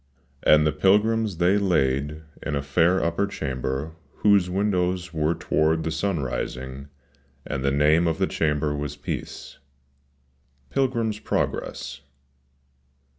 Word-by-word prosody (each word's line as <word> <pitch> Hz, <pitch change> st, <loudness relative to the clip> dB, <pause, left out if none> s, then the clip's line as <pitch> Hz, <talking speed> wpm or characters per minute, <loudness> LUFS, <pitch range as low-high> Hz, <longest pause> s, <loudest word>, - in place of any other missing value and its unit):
"cAnd 75 Hz, 0 st, +7 dB
the 75 Hz, -, +3 dB
pilgrims 105 Hz, +1 st, +2 dB
they 90 Hz, +4 st, +3 dB
laid 75 Hz, -5 st, 0 dB, 0.2 s
in 75 Hz, -, -2 dB
a 70 Hz, -, -2 dB
fair 85 Hz, +6 st, +2 dB
upper 85 Hz, +4 st, 0 dB
chamber 65 Hz, -2 st, -3 dB, 0.3 s
Ivhose 100 Hz, -4 st, +5 dB
Windows 90 Hz, -2 st, 0 dB
Ivere 80 Hz, +1 st, 0 dB
toward 80 Hz, +1 st, +1 dB
the 80 Hz, -, -2 dB
sun 85 Hz, 0 st, -1 dB
rising, 65 Hz, +2 st, -5 dB, 0.6 s
and 65 Hz, -, -3 dB
the 70 Hz, -, +2 dB
name 75 Hz, +4 st, +3 dB
of 80 Hz, -1 st, 0 dB
the 95 Hz, -, +2 dB
Chamber 75 Hz, -3 st, 0 dB
ivas 75 Hz, 0 st, -4 dB
Peace." -, -, -6 dB, 0.5 s
— 70 Hz, 0 st, -40 dB
'Pilgrim's 115 Hz, -5 st, 0 dB
Progress. -, -, -3 dB
80 Hz, 125 wpm, -24 LUFS, 70-95 Hz, 0.6 s, cAnd